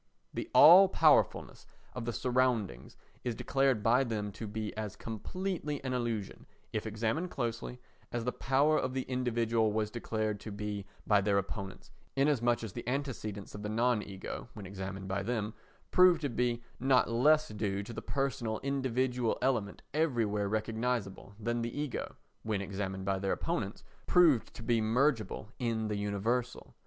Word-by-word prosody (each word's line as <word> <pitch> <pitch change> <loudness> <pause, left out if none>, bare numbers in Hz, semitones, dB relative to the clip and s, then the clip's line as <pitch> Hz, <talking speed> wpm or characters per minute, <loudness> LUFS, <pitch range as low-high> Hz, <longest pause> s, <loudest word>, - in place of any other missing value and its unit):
The - - -4
all 180 +6 +9
powerfulness - - +3 0.3
of 125 -2 -5
the 120 - -1
surroundings 120 - 0 0.3
is 120 -2 -2
declared 135 -3 +1
by 120 +4 +4
them 105 -4 -3
to 110 +3 -7
be 105 0 -4
as 105 -2 -4
completely 150 - -4
an 130 -1 -2
illusion, 115 -5 -3 0.3
if - - -2
examined 115 +11 -1
closely, 120 -2 -4 0.3
as 120 -1 -2
the 125 - +1
power 145 +5 +2
of 130 0 -2
the 130 - 0
individual 115 -3 +1
was 105 0 -1
declared 110 -3 -2
to 110 - -8
be 100 -1 -4 0.2
by 105 -1 +4
their 100 0 +2
opponents, 100 0 -5 0.2
inasmuch 125 -5 +2
as 110 -5 -6
the 120 - -7
antecedents 120 -7 -3
of 105 - -7
the 105 - -4
non 115 +1 +2
ego, 100 +3 -7
when 105 -3 -8
examined 95 0 -6
by 95 +1 -1
them, 110 0 -2 0.4
prove 180 -2 +7
to 145 - -1
be 120 0 0 0.2
not 130 0 +4
less 155 +6 +4
due 100 -1 -2
to 115 - -8
the - - -5
personal 130 -5 -2
individual 130 -3 0
element 120 -6 -1
everywhere 115 -10 +1
recognisable, 110 -2 -2
than 120 +2 -1
the 120 +4 -3
ego, 150 -3 -3 0.3
when 110 -2 -1
examined 95 -1 -4
by 95 -1 0
their 95 0 0
opponents, - - -3 0.2
proved 160 -10 +5
to - - -8
be 115 0 +2
mergeable 110 -2 +1
in 115 -3 -1
the 105 - -1
universal. 105 +5 -2
115 Hz, 160 wpm, -32 LUFS, 105-130 Hz, 0.4 s, all